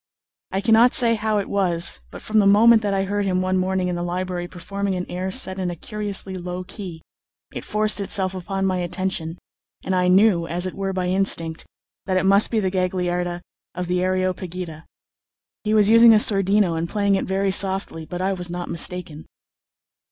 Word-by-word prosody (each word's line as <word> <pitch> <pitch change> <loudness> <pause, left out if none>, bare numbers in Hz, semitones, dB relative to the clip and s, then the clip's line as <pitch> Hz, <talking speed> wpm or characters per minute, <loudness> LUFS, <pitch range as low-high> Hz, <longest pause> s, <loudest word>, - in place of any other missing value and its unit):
I 195 - -2
cannot 230 +3 +4
say 235 -2 +5
how 215 -1 -1
it 200 - -2
was; 175 - +1
but - - -11
from 215 0 +1
the 200 - +4
moment 220 +3 +6
that 205 -2 -2
I 195 -1 0
heard 205 +1 -2
him 185 -2 0
one 185 0 0
morning 185 0 -1
in 180 - -2
the 175 - -4
library 175 0 -3
performing 195 +2 -4
an 180 0 -3
air 180 +2 -4
set 190 -3 -1
in 185 -1 -2
a 175 - -5
curiously 205 0 -6
low 180 0 -5
key, 180 -4 -9 0.5
it - - -6
forced 215 -1 0
itself 190 -1 0
upon 195 +1 -3
my 185 -1 0
attention, 175 -2 -4 0.5
and 190 - -1
I 180 -1 +1
knew, 185 -2 +3
as 175 +2 -2
it 185 - -4
were 195 0 -3
by 185 -1 -2
instinct, 180 -3 0 0.4
that 185 -1 +1
it 185 - +1
must 200 +2 +4
be 225 - 0
the 190 -3 -1
Gagliarda 180 -1 -2 0.3
of 180 - -3
the 180 +1 -1
"Areopagita." 185 -3 -3 0.8
He 215 0 0
was 210 0 +4
using 230 0 +8
a - - +6
sordino 195 -3 +3
and 165 +1 -3
playing 200 -2 0
it 195 - 0
very 195 +1 0
softly; 190 -4 +1
but 180 +3 -6
I 195 +1 0
was 180 -2 -6
not 175 0 -5
mistaken. 170 -2 -2
185 Hz, 195 wpm, -22 LUFS, 180-200 Hz, 0.8 s, using